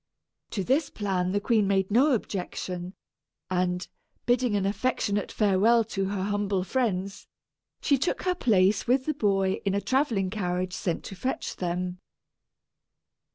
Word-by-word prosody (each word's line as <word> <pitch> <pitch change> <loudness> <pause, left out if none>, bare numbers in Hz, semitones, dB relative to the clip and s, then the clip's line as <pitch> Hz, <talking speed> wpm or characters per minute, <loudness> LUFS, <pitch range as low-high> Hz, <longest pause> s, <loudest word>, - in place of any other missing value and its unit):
To 195 - -2
this 270 - +1
plan 185 -3 -1
the 205 - +1
queen 215 -1 +2
made 195 0 +1
no 265 +6 +5
objection; 180 -4 -4 0.6
and, 180 0 0 0.4
bidding 245 -2 +2
an 200 -1 +1
affectionate 205 -1 0
farewell 215 +3 +4
to 195 0 0
her 195 -1 -2
humble 200 -2 0
friends, 200 -4 -2 0.5
she 280 -3 +2
took 330 - -1
her 365 - +2
place 205 - +2
with 260 +2 +2
the 310 - 0
boy 195 -6 +1
in 195 -1 0
a - - +2
travelling 225 -7 0
carriage 180 -2 -2
sent 175 -4 -2
to 195 - -8
fetch 255 +8 -3
them. 180 0 -2
200 Hz, 145 wpm, -27 LUFS, 185-235 Hz, 0.6 s, no